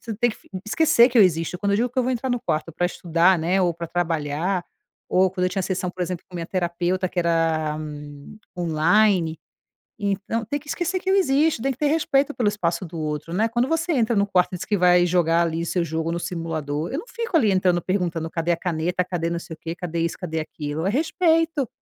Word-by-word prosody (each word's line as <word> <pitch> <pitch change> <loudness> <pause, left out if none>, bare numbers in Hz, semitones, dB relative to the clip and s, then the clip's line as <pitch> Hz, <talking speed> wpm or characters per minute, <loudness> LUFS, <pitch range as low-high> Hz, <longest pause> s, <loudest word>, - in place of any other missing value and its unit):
você 230 - -9
não 210 - -8
tem 240 0 +3
que - - -10
fi - - -23 0.2
esquecer 240 -1 +5
que 245 - -3
eu - - +9
existo. 165 -1 +1
Quando 200 -1 +1
eu 200 - +3
digo 245 +3 +1
que 255 - -3
eu - - +4
vou 255 - 0
entrar 255 +2 -2
no 245 -1 0
quarto 160 0 -2
pra 175 +3 0
estudar, 175 +1 +2
né, 180 +4 +1
ou 175 - +2
pra 170 0 -5
trabalhar, 165 +1 -1 0.4
ou 185 0 +3
quando 185 -1 -2
eu - - -1
tinha 195 - -1
sessão, 180 -1 -2
por 185 - -12
exemplo, 180 -1 -4
com 180 - -16
minha 165 -1 -4
terapeuta 180 +1 -1
que 180 - -6
era, 165 -2 +1
hum, 150 +4 -9 0.2
online. 170 +1 +2 0.6
Então, 205 +3 -2
tem 285 +6 -2
que 300 - -20
esquecer 355 +4 -1
que 380 - -3
eu 390 - +4
existo. 305 - +3
Tem 270 +2 +1
que 255 - -7
ter 295 - +2
respeito 290 -2 +2
pelo 240 -4 +1
espaço 180 -3 -2
do 165 0 -7
outro, 150 +1 -4
né. 215 +5 +2
Quando 240 +2 +1
você 330 +1 0
entra 235 -3 +2
no 200 0 +2
quarto 180 -2 +2
diz - - -5
que 205 - 0
vai 180 0 +5
jogar 170 -1 +3
ali, 165 0 -1
o - - -3
seu 175 0 0
jogo 160 0 -2
no 170 - -2
simulador, 160 -3 -3
eu 280 - -2
não 470 - -10
fico 465 -6 -4
ali 215 -8 +3
entrando, 180 -2 +2
perguntando: 170 -4 -1
"Cadê 165 +1 -1
a 170 - +1
caneta, 180 +1 -1
cadê 170 -2 -2
não 170 - -2
sei 165 -1 -9
o - - -32
quê, 165 0 -5
cadê 170 -2 -4
isso, 170 - -1
cadê 160 -3 -3
aquilo". 155 +1 -4
É - - +2
respeito!" 325 0 +1
180 Hz, 245 wpm, -23 LUFS, 165-225 Hz, 0.6 s, eu